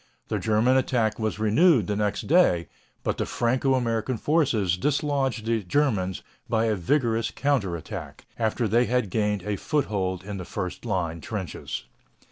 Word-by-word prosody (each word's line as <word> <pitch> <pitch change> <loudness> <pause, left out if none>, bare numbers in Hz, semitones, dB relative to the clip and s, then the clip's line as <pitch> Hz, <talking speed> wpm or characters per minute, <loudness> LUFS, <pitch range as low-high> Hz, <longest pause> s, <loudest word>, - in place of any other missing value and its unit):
The - - 0
German 110 +4 +3
attack 120 -4 +1
was 110 -2 -1
renewed 115 - +4
the 105 - -1
next 105 0 0
day, 140 - +4 0.4
but - - -1
the - - -1
Franco 130 +3 +1
American 115 0 -1
forces 120 - +2
dislodged 135 0 0
the 115 -1 +1
Germans 95 -4 0 0.3
by 110 0 +2
a 110 - +2
vigorous 115 - +1
counter 130 -11 0
attack, 80 - -8
after 115 +1 +1
they 120 +4 +3
had 120 -6 0
gained 105 -2 0
a 105 0 -2
foothold 95 - -1
in 100 0 -5
the 90 - -5
first 90 +4 -5
line 85 -6 -2
trenches. 100 -2 -5
110 Hz, 155 wpm, -26 LUFS, 100-130 Hz, 0.4 s, renewed